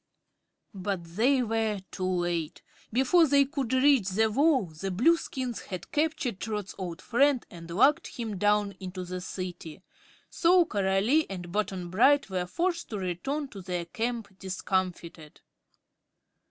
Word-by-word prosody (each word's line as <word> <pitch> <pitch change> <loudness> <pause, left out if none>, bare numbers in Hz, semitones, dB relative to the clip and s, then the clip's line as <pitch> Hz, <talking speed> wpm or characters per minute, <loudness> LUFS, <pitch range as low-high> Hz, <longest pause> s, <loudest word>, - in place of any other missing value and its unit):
But 190 -2 -3
they 235 +11 +2
were 220 -2 0
too 185 - -3
late. 175 -3 -2 0.3
Before 270 +8 +4
they 280 0 +5
could 270 -3 -3
reach 260 -6 +4
the 220 +3 +2
wall 280 -1 +3
the 160 +4 -6
Blueskins 255 - 0
had 185 -2 -7
captured 295 -9 -1
Trot's 210 -3 -4
old 175 -3 -6
friend 270 +1 +2
and 170 -1 -10
lugged 270 - +3
him 220 -6 -5
down 205 0 +2
into 185 -1 -6
the 180 0 -5
City, 180 -2 -7 0.4
so 355 +1 +4
Coralie 205 - +1
and 175 -3 -6
Button 190 -3 -2
Bright 260 +3 +4
were 180 -1 -1
forced 340 - -1
to 215 - -4
return 200 - -3
to 195 - -9
their 180 -2 -3
camp 225 0 -4
discomfited. 180 -4 -3
205 Hz, 140 wpm, -28 LUFS, 185-260 Hz, 0.4 s, they